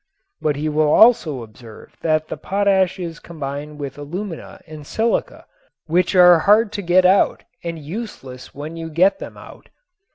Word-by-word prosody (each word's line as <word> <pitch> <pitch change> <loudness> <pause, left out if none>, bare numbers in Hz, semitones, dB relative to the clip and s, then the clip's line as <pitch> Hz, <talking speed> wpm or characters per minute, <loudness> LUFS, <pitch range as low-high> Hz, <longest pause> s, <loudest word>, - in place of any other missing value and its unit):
But 150 -2 0
he 150 +2 -3
will 155 0 +1
also 160 - +4
observe 110 0 -14
that 155 -1 0
the - - -5
potash 190 +2 +1
is 170 -3 -6
combined 150 -2 -7
with 140 -1 -7
alumina 170 +4 -7
and 155 -1 -11
silica, 225 +10 -2 0.4
which 180 +4 +1
are 180 -2 +7
hard 210 +5 +3
to 205 - -4
get 180 0 +3
out 190 +2 +3 0.2
and 170 -1 -4
useless 150 - -8
when 150 +3 -7
you 165 -1 -6
get 185 - +2
them - - -9
out. - - -14
165 Hz, 160 wpm, -20 LUFS, 150-190 Hz, 0.4 s, are